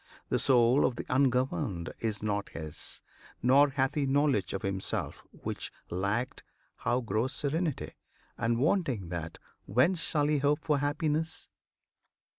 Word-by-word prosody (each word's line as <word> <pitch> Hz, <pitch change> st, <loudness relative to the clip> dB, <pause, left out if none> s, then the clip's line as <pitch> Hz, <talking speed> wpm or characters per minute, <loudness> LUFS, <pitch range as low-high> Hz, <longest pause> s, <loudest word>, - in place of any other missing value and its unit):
The -, -, +2 dB
soul 125 Hz, 0 st, +5 dB
of 125 Hz, -, +2 dB
the -, -, -5 dB
ungoverned 125 Hz, -10 st, +1 dB
is 110 Hz, -2 st, -2 dB
not 100 Hz, -1 st, -1 dB
his, 80 Hz, -2 st, -5 dB, 0.4 s
Nor 140 Hz, +4 st, +6 dB
hath 135 Hz, -1 st, 0 dB
he 145 Hz, -2 st, 0 dB
knowledge 135 Hz, -, +2 dB
of 95 Hz, -, -4 dB
himself; 95 Hz, -1 st, -2 dB
which -, -, -5 dB, 0.2 s
lacked, 100 Hz, +7 st, -1 dB, 0.4 s
How 125 Hz, +2 st, 0 dB
grows 115 Hz, +4 st, -1 dB
serenity? 155 Hz, +1 st, -1 dB, 0.4 s
and, 115 Hz, 0 st, 0 dB
wanting 130 Hz, -, +1 dB
that, 85 Hz, -2 st, -5 dB, 0.3 s
Whence 130 Hz, -, +3 dB
shall 150 Hz, -2 st, +1 dB
he 150 Hz, 0 st, +2 dB
hope 145 Hz, +1 st, +1 dB
for 150 Hz, -3 st, +2 dB
happiness? 150 Hz, +2 st, -1 dB
130 Hz, 135 wpm, -30 LUFS, 105-145 Hz, 0.4 s, Nor